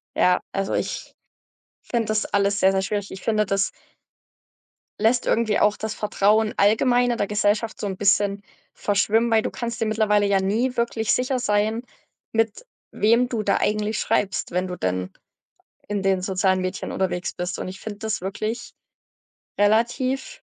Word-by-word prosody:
Ja, 180 0 +3
also, 195 0 -2
ich - - -3 0.7
finde 235 -2 -1
das 215 -1 +1
alles 200 0 +1
sehr, 190 - +5
sehr 190 0 +1
schwierig. 205 0 -3
Ich 190 - -9
finde, 215 -1 +1
das 195 0 +1 1.3
lässt 225 +3 +2
irgendwie 225 -2 +2
auch 210 0 +3
das 220 0 -4
Vertrauen 210 +1 +2
allgemein 245 +4 +3
in 235 - -1
der 205 - 0
Gesellschaft 210 +2 0
so 205 - -2
'n 190 - -3
bisschen 200 0 +2 0.3
verschwimmen, 220 +3 +1
weil 220 -1 +4
du - - -2
kannst 235 -1 -5
dir - - +2
mittlerweile 210 -1 +2
ja 200 -1 +3
nie 225 +7 0
wirklich 235 -1 +1
sicher 255 +1 0
sein, 215 -1 +1 0.5
mit 225 - 0 0.3
wem 235 +4 +3
du 235 -3 -2
da 200 - +2
eigentlich 210 +1 0
schreibst, 195 -1 0
wenn 180 +2 -1
du 180 - -5
denn 90 - -2 0.8
in 205 -1 -2
den 190 -1 +1
sozialen 185 0 +1
Medien 185 +1 -4
unterwegs 180 -2 -2
bist. 180 0 -4
Und - - -4
ich 190 0 -8
finde 205 -2 -7
das 220 -1 -2
wirklich, 215 +5 -4 0.9
relativ 250 - +1
210 Hz, 165 wpm, -23 LUFS, 195-225 Hz, 1.3 s, sehr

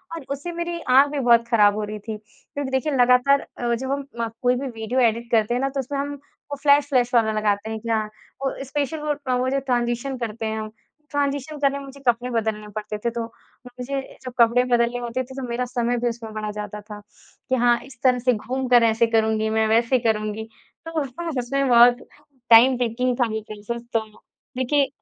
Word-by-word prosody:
और 320 -5 -8
उससे 285 +5 -6
मेरी 340 0 -3
आँख 270 +3 +7
भी 295 - -2
बहुत 235 -2 +4
खराब 210 -3 +4
हो 215 - -2
रही 210 0 -5
थी। 215 0 -6
क्योंकि 265 +5 -8
देखिए, 265 +3 0
लगातार 250 +2 +4 0.2
अ, 240 -1 -1
जब 260 +3 -4
हम 280 0 -2 0.4
कोई 250 0 +3
भी 270 +2 -3
वीडियो 230 +1 -3
एडिट 235 +2 -6
करते 225 0 +2
हैं 250 - 0
ना 275 - +1
तो 275 0 -4
उसमें 275 +2 -3
हम 285 +1 -3
वो 285 0 -11
फ्लैश-फ्लैश 280 -4 +3
वाला 220 -2 +4
लगाते 210 0 0
हैं। 220 - -4
कि 230 - -7
हाँ, 220 -1 +1 0.4
वो 270 -1 -1
स्पेशल 290 +2 -2
वो 300 0 -1 0.2
वो 255 +1 0
जो 275 +1 +1
ट्रांज़ीशन 245 0 -1
करते 225 -1 -4
हैं 220 0 -2
हम, 215 - -5 0.4
ट्रांज़ीशन 285 +1 -2
करने 280 -1 +2
में 280 - -9
मुझे 275 +1 -12
कपड़े 240 +1 +2
बदलने 220 -2 -2
पड़ते 210 0 -4
थे। 235 - +3
तो 235 0 -3 0.4
मुझे 250 +2 -4 0.2
जब 255 - -7
कपड़े 235 +1 +5
बदलने 240 -1 +1
होते 245 +2 -3
थे 260 +1 -12
तो 265 -2 -5
मेरा 245 +1 -1
समय 245 -1 -1
भी 240 +1 0
उसमें 230 -2 -7
बड़ा 215 -1 -4
जाता 210 0 -6
था 210 0 -10 0.5
कि, 260 - +3
हाँ, 240 -1 +3
इस 260 -3 -15
तरह 250 -1 +4
से 250 +1 +2
घूम 255 +4 -3
कर 245 -1 +6
ऐसे 230 +1 +3
करुँगी 220 -1 +1
मैं, 220 0 +2
वैसे 230 +3 +3
करुँगी। 220 -1 -1 0.4
तो 330 - -6
उसमें 280 +5 -6
ना 330 - -2
सच 240 - -11
मे 275 0 +2
बहुत 245 0 +6 0.5
टाइम 240 +3 +7
टेकिंग 245 +1 0
था 240 - +4
वो 220 - -3
प्रॉसेस। 215 +2 -6
तो 225 - +3 0.6
देखिए 275 +2 +2
245 Hz, 215 wpm, -23 LUFS, 225-270 Hz, 0.6 s, आँख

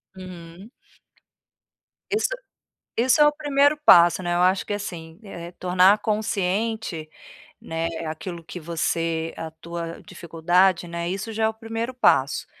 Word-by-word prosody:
Uhum. 185 +2 -11 1.4
Isso 425 +2 +1 0.7
isso 255 +5 +3
é - - +8
o - - +4
primeiro 290 0 +2
passo, 175 +1 +7
né. 175 -1 -2
Eu 175 - +1
acho 185 +1 +2
que 205 - -3
assim, 170 -5 -6
eh, 175 -3 -9
tornar 185 +3 +4
consciente, 210 -4 -2 0.5
né, 165 0 -3 0.2
aquilo 160 +2 -6
que 175 +2 -8
você 165 0 -2
a 160 -1 -5
tua 170 +1 -7
dificuldade, 175 0 +1
né, 170 0 -4
isso 195 +4 -4
já 220 +1 -2
é - - +3
o - - -5
primeiro 225 +2 -5
passo, 140 - +2
180 Hz, 140 wpm, -24 LUFS, 165-220 Hz, 1.4 s, é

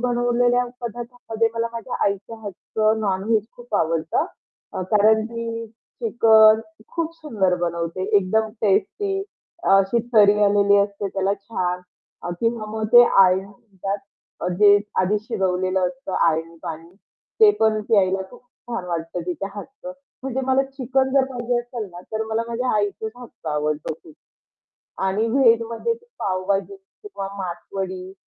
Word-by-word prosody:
बनवलेल्या 245 0 +2 0.2
पदार्थामध्ये 235 -1 -3
मला 230 0 0
माझ्या 230 +2 -5
आईच्या 200 +3 -2
हातचं 215 +2 -1
नॉन-व्हेज 210 +2 +1
खूप 240 -3 -8
आवडतं. 160 -2 +1 0.5
अ, 190 - -3
कारण 215 +1 +5
की 230 0 -5
चिकन 220 - +4 0.3
खूप 330 -1 -2
सुंदर 220 - 0
बनवते, 170 +1 -2
एकदम 220 +3 +2
टेस्टी 390 - +1 0.5
अशी 195 +4 +3
तर्री 210 -2 +6
आलेली 200 0 +4
असते 200 0 -1
त्याला 195 +1 0
छान. 185 -3 -3 0.4
अ, 175 - -4
किंवा 230 -1 0
मग 220 0 -3
ते 240 0 +10
आळणी 190 -3 +5
म्हणतात 195 0 -6 0.4
अ, - - 0
जे 205 -1 +7 0.2
आधी 205 +3 +1
शिजवलेलं 190 -4 0
असतं 265 -1 -7 0.2
आळणी 165 +1 -2
पाणी, 165 +1 -7 0.5
ते 430 -1 +9
पण 220 -1 +3
प्यायला 190 -3 +3
खूप 245 - -15 0.3
छान 235 -6 -3
वाटतं 165 +1 -3
तिच्या 180 +2 -3
हातचं. 270 +5 -9 0.3
म्हणजे 265 0 -2
मला 265 +1 +3
चिकन 265 0 +1
जर 270 - +5
पाहिजे 245 -1 -1
असेल 240 -3 -5
ना, 175 0 -10
तर 220 0 -1
मला 225 +1 0
माझ्या 245 +2 -1
आईच्याच 210 +1 -2
हातचं 245 -9 -10
आवडतं 150 +1 -1
खूप. 155 - -15 0.9
आणि 200 +4 +1
व्हेजमध्ये 230 - +2
ती 470 +1 -16
पावभाजी 195 - -1
किंवा 390 - -9
मासवडी 185 +1 -5
215 Hz, 140 wpm, -22 LUFS, 190-240 Hz, 0.9 s, ते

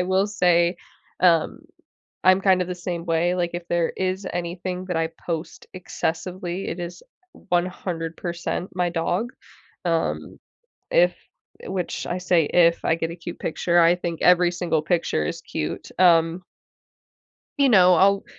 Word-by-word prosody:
I 180 - +1
will 190 +2 +2
say, 175 -3 +2 0.4
um, 170 - +3 0.6
I'm, 185 +1 +6
kind 190 -2 +4
of, 180 - -2
the 180 - -3
same 175 -1 -5
way, 170 +2 +1
like, 175 -1 -1
if 175 0 -6
there 170 -1 +1
is 190 +1 -2
anything 180 +1 -4
that 180 -2 -3
I 165 0 0 0.2
post 165 -1 -5
excessively, 180 +1 -4
it 170 - -5
is 175 0 -7 0.5
100% 175 0 -3
my 180 -1 +1
dog, 175 +8 -1 0.5
um, 165 -1 -2 0.5
if, - - +5 0.5
eh, - - -10
which 185 -2 -3
I 175 - -2
say, 175 -2 +2
if 170 -1 +3
I - - +3
get 165 0 -3
a 170 - -7
cute 170 0 -8
picture, 175 +2 +1
I 170 +1 +5
think 170 -2 -4
every 180 -1 +5
single 170 -3 -1
picture 165 - 0
is - - -4
cute, 75 - -5
um 170 0 +4 1.2
you 280 -1 +4
know, 185 -5 +6
I'll 195 +3 +3
175 Hz, 155 wpm, -23 LUFS, 170-185 Hz, 1.2 s, I'm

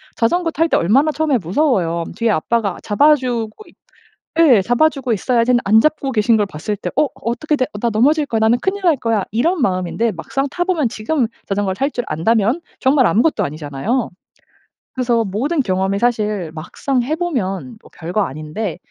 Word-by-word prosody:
자전거 330 +9 +1
탈 325 +1 +1
때 - - +3
얼마나 265 - +3
처음에 300 -4 0
무서워요. 175 - 0
'뒤에 230 -1 0
아빠가 210 +3 0
잡아 290 +9 +4
주고 245 - -4
있 - - -19 0.7
예 260 -11 +6
잡아 245 +9 +3
주고 270 -5 -4
있어야지.' 235 +3 +1
했는데 240 -1 +4
안 215 +3 +5
잡고 300 -3 0
계신 220 0 +3
걸 205 - +1
봤을 195 +4 -4
때 180 - -4
'어 300 +1 +3
어떻게 250 +6 -2
돼. 255 - +1 0.2
나 235 - +1
넘어질 290 +8 +3
거야. 225 - -1
나는 225 +3 +3
큰일 385 0 -2
날 335 -4 +4
거야.' 230 -5 -1
이런 320 - +1
마음인데 190 +3 0
막상 270 +10 -3
타 350 - -1
보면 345 -8 0
지금 240 +5 -1 0.2
자전거를 195 -1 -1
탈 275 +8 0
줄 245 - -3
안다면 225 - +1 0.2
정말 265 -2 +3
아무것도 220 - +2
아니잖아요. 155 - -3 0.8
그래서 240 -3 +1
모든 265 - -1
경험이 190 -2 0
사실 210 -8 -1
막상 245 - -2
해 280 +6 -1
보면 250 - -3
뭐 - - -18
별거 175 +6 -2
아닌데 155 +7 -5
235 Hz, 375 characters per minute, -18 LUFS, 200-280 Hz, 0.8 s, 예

